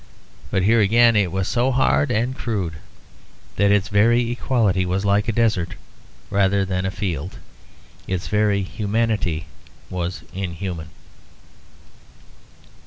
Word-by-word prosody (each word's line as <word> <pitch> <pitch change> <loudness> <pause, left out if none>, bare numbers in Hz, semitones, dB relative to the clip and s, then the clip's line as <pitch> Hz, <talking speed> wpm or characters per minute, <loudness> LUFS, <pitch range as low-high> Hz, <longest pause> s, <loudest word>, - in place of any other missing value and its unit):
But 95 - 0
here 115 +4 +4
again 115 +3 +5
it 100 -5 +2
was 95 -1 -1
so 125 +2 +1
hard 135 +2 +2
and 120 +2 0
crude 100 - -3 0.8
that 100 0 +3
its 100 -1 +3
very 115 +4 +3
equality 115 -7 +1
was 95 +2 -1
like 100 +1 +2
a - - +2
desert 105 -6 0 0.6
rather 100 0 +2
than 95 0 -2
a - - 0
field. 90 -4 -4 0.7
Its 95 -2 -2
very 105 -2 +1
humanity 105 -5 -1 0.5
was 90 0 -4
inhuman. 90 -3 -5
100 Hz, 120 wpm, -22 LUFS, 95-115 Hz, 0.8 s, again